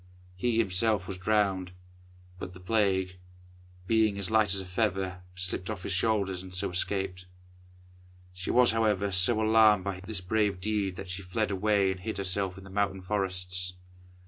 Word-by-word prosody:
He 115 +5 0
himself 105 -1 +2
was 95 -2 -6
drowned, 95 -3 +1 0.7
but 90 0 -7
the - - -11
Plague, 95 -2 0 0.7
being 110 -1 +2
as 100 +1 -3
light 110 -3 +4
as - - +1
a 95 - -5
feather, 95 -1 -1
slipped 90 +1 -2
off 100 -4 -5
his 95 - -3
shoulders, 95 -1 0
and 95 -1 -10
so 90 -1 -2
escaped. 90 0 -2 1.1
She 90 0 -6
was, 125 -1 +5
however, 105 -3 +1
so 95 +5 +3
alarmed 110 -2 +5
by 100 -1 -4
this 95 +1 -4
brave 100 +1 0
deed 100 -1 -1
that 90 0 -7
she 95 +1 -5
fled 100 +3 -2
away 100 0 +2
and 95 - -5
hid 110 +4 -5
herself 95 -1 -1
in 95 - -11
the 95 - -12
mountain 100 -1 -1
forests. 90 -2 -1
95 Hz, 170 wpm, -29 LUFS, 90-105 Hz, 1.1 s, was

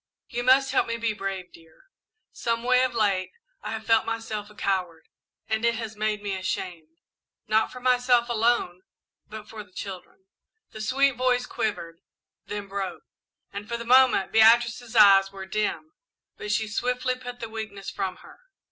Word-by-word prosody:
"You 240 -1 -3
must 265 +2 +4
help - - +2
me 230 0 -2
be 230 -1 -1
brave, 195 -3 -5
dear. 165 -1 -19 0.5
Someway, 240 +2 +1
of 255 -2 0
late, 195 -4 +1 0.3
I - - -6
have 220 0 -6
felt 225 -1 +4
myself 225 -2 -4
a 210 - -17
coward, 180 -5 -2 0.4
and 220 0 -1
it 235 0 +2
has 220 -1 -6
made 210 -1 -2
me 200 -1 -2
ashamed. 175 -4 -5 0.5
Not 220 +1 +2
for 250 - -9
myself 245 -1 +3
alone, 230 -6 +1 0.5
but 215 0 -9
for 215 -1 -8
the 190 - -24
children 195 - -9 0.2
" 445 - -56
The 215 - -8
sweet 270 +4 +2
voice 250 0 +1
quivered, 170 -9 -4 0.5
then 205 -1 -5
broke; 195 -3 -5 0.5
and 205 +1 -7
for 235 - -2
the 235 - -7
moment 255 -4 +5
Beatrice's 235 +1 +4
eyes 195 -3 +7
were 195 -1 -8
dim, 215 +10 -2 0.4
but 210 - -5
she 220 +1 0
swiftly 250 +4 -1
put 245 -1 -8
the 230 - -5
weakness 215 -3 -7
from 190 -2 -3
her. - - -15
220 Hz, 170 wpm, -26 LUFS, 195-240 Hz, 0.5 s, eyes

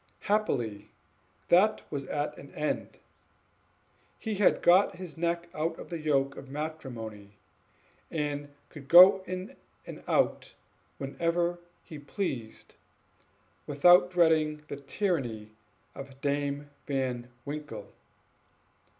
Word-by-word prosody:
Happily 125 - -1 0.6
that 200 +5 +4
was 140 -2 -3
at 150 0 -2
an 140 - -12
end; 150 0 -3 1.2
he 220 - -4
had 205 -1 +3
got 185 +3 +5
his 180 -3 -9
neck 170 +1 -1
out 160 +1 -2
of - - -10
the 170 - -3
yoke 140 -3 +1
of 135 - -10
matrimony, 120 -9 -7 0.7
and 145 -2 -3 0.2
could 140 -3 -12
go 185 +4 +9
in 185 +1 -5 0.3
and - - -9
out - - +1 0.4
whenever 170 +5 -1 0.2
he 155 - -10
pleased, 130 - -5 0.9
without 175 +5 +6
dreading 160 -4 +2
the - - -5
tyranny 135 - -2 0.4
of 135 -1 -10
Dame 145 0 -2 0.2
Van 130 -3 -2 0.2
Winkle. 150 +1 -7
150 Hz, 105 wpm, -29 LUFS, 135-175 Hz, 1.2 s, go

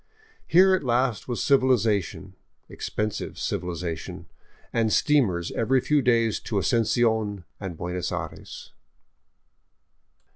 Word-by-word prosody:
Here 190 +3 +6
at 185 - +1
last 125 -2 0
was 120 -2 -2
civilization, 120 - +1 0.2
— - - -47
expensive 105 -1 -4
civilization 85 -2 -4 0.3
— - - -32
and 115 -2 +1
steamers 100 - +2
every 130 +4 +1
few 150 +3 +1
days 115 -3 +2
to 110 - -6
Asuncion 110 -2 +1 0.2
and 95 -5 -6
Buenos 90 +1 -3
Aires. - - -7
115 Hz, 110 wpm, -25 LUFS, 95-130 Hz, 0.3 s, Here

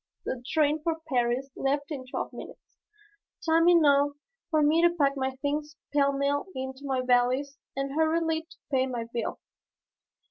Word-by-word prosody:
The 245 -1 -4
train 305 -1 +2
for 325 +1 -1
Paris 250 +1 0
left 285 +2 -1
in 270 -4 -5
twelve - - -4
minutes, - - -12 0.7
time 330 +1 +5
enough 285 -4 +5 0.4
for 310 -3 +3
me 310 +3 +4
to 345 - +6
pack 285 -5 +1
my 265 -1 -2
things 295 +1 -2 0.2
pell 280 -1 +4
mell 280 +3 0
into 265 +1 -5
my 260 -1 0
valise 255 +3 +2 0.2
and 275 0 -2
hurriedly 320 +1 +1
to - - -16
pay 260 -1 +2
my 245 -3 -3
bill. 235 -2 -2
280 Hz, 155 wpm, -28 LUFS, 265-310 Hz, 0.7 s, to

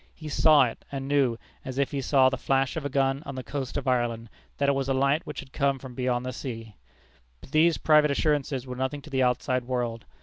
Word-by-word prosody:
He 155 -2 -8
saw 150 -1 +5
it, 120 - -3
and 135 -1 -4
knew, 135 -5 +2 0.3
as 130 0 -6
if 140 -1 +1
he 140 -2 -2
saw 135 0 +4
the 135 - -2
flash 135 0 0
of 160 - -3
a 145 - -2
gun 135 0 +1
on 140 - -7
the 130 - -5
coast 135 -2 -4
of - - -4
Ireland, 120 -3 0 0.3
that 140 - +1
it - - +5
was 135 -1 -1
a 135 - +2
light 140 +5 +1
which 150 - -5
had 130 - -16
come 140 -2 +1
from 130 -1 -10
beyond 125 0 -1
the 130 - -4
sea. 115 -4 -7 0.7
But 110 - -15
these 160 +1 +4
private 150 -1 +4
assurances 140 -2 0
were 125 -1 -6
nothing 130 +3 -3
to 155 - -12
the 135 -1 +1
outside 125 0 +1
world. 120 -3 -3
135 Hz, 240 wpm, -27 LUFS, 125-140 Hz, 0.7 s, saw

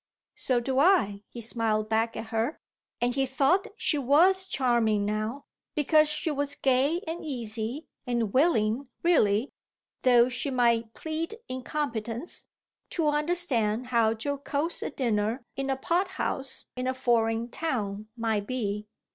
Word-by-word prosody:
"So 255 -2 +2
do 260 +2 0
I," 275 - +3
he 235 - -8
smiled 220 -2 0
back 225 +1 0
at 225 - -6
her; 225 +6 -1 0.4
and 245 +1 +1
he 270 0 +1
thought 280 +8 +2
she 315 -9 +2
was 355 +8 +4
charming 235 - +2
now, 215 +6 -3 0.3
because 305 0 +4
she 305 +1 -2
was 285 0 0
gay 275 +7 +2
and 330 +2 -4
easy 240 0 -4 0.2
and 235 -4 -1
willing 255 -4 +2 0.2
really, 235 -8 +3 0.5
though 245 -1 +5
she 255 +3 -2
might 235 -3 +1
plead 320 +5 -4
incompetence, 255 0 -4 0.4
to 320 -4 +1
understand 295 -8 +1
how 225 -2 +3
jocose 285 +5 -2
a - - -2
dinner 235 -2 -1
in 275 +1 -3
a 270 - 0
pothouse 340 -4 -1
in 255 0 -3
a 260 - 0
foreign 230 -2 +1
town 215 -10 -3
might 220 -3 -1
be. 210 -4 -3
255 Hz, 140 wpm, -28 LUFS, 225-295 Hz, 0.5 s, though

